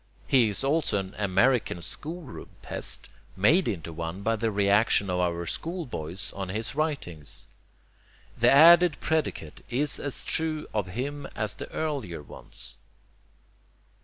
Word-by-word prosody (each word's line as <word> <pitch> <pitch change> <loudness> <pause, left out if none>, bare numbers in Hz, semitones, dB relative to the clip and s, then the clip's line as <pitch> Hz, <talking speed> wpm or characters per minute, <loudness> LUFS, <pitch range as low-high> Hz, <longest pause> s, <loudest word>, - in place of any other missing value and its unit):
He 125 -5 +4
is 105 - -2
also 145 -5 +1
an 95 0 -4
American 105 -1 +2
school 165 - -6
room 130 - -10
pest, - - -2 0.3
made 155 - +4
into 85 -6 -3
one 85 +4 -5
by 115 +1 +2
the 115 +1 0
reaction 100 -1 +3
of 90 - 0
our 85 -1 0
schoolboys 115 - -4
on 95 -2 -5
his 110 +4 -2
writings. 135 - -2 0.9
The 120 +1 +4
added 170 +3 +7
predicate 155 - -2
is 135 +2 +1
as 145 -2 -2
true 160 -1 0
of 105 -3 -1
him 145 +2 -3
as 105 -1 -1
the - - -8
earlier 135 - -3
ones. - - -8
115 Hz, 135 wpm, -27 LUFS, 95-145 Hz, 0.9 s, added